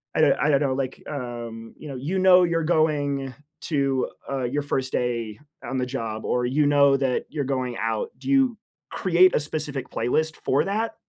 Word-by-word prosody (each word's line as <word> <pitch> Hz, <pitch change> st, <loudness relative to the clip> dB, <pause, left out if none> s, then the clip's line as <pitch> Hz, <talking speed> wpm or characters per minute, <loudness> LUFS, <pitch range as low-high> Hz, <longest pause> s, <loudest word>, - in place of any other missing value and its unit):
I -, -, +3 dB
do 145 Hz, -3 st, +6 dB
I 150 Hz, -, +2 dB
don't 140 Hz, -1 st, +3 dB
know, 135 Hz, -2 st, +1 dB
like, 130 Hz, -1 st, -3 dB
um, 120 Hz, -4 st, -6 dB
you 155 Hz, -, -10 dB
know, 140 Hz, -, -6 dB
you 150 Hz, +9 st, -2 dB
know 185 Hz, -1 st, +7 dB
you're 165 Hz, -1 st, +1 dB
going 145 Hz, -5 st, +1 dB, 0.3 s
to, 140 Hz, -5 st, 0 dB, 0.2 s
uh, 135 Hz, -2 st, -2 dB
your 140 Hz, +4 st, -1 dB
1st 135 Hz, -2 st, -2 dB
day 115 Hz, -3 st, -2 dB, 0.3 s
on 135 Hz, +2 st, -2 dB
the 125 Hz, -, 0 dB
job 115 Hz, -4 st, -4 dB
or 125 Hz, 0 st, 0 dB
you 140 Hz, +4 st, +2 dB
know 140 Hz, -1 st, +5 dB
that 130 Hz, -2 st, 0 dB
you're 145 Hz, -3 st, -3 dB
going 130 Hz, -3 st, -2 dB
out, 115 Hz, -1 st, -2 dB
do -, -, -6 dB
you 265 Hz, -4 st, +3 dB, 0.3 s
create 185 Hz, 0 st, +4 dB
a -, -, +3 dB
specific 150 Hz, -2 st, -3 dB
playlist 155 Hz, +7 st, 0 dB
for 140 Hz, +3 st, 0 dB
that? 215 Hz, +4 st, -2 dB
140 Hz, 195 wpm, -24 LUFS, 125-155 Hz, 0.3 s, know